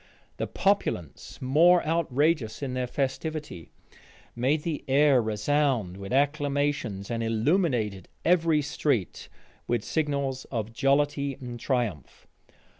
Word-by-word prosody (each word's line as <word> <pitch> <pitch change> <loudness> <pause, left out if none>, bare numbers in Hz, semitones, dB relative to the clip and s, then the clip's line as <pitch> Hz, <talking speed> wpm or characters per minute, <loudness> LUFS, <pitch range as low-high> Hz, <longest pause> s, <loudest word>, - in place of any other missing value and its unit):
The - - -2
populace 195 - -1
more 165 +7 +5
outrageous 150 -5 0
in 130 -2 -3
their 125 -1 -1
festivity, 140 - -4 0.7
made 135 +6 +1
the 160 -5 -3
air 135 -1 +4
resound 110 -2 0
with 100 0 -8
acclamations, 145 -7 0
and 115 -1 -2
illuminated 115 - 0 0.2
every 165 -3 +3
street 140 - -2 0.4
with 120 -3 0
signals 140 -4 -1
of 115 -3 -4
jollity 140 +1 +1
and 125 -3 -8
triumph. 115 - -3
135 Hz, 110 wpm, -27 LUFS, 115-150 Hz, 0.7 s, more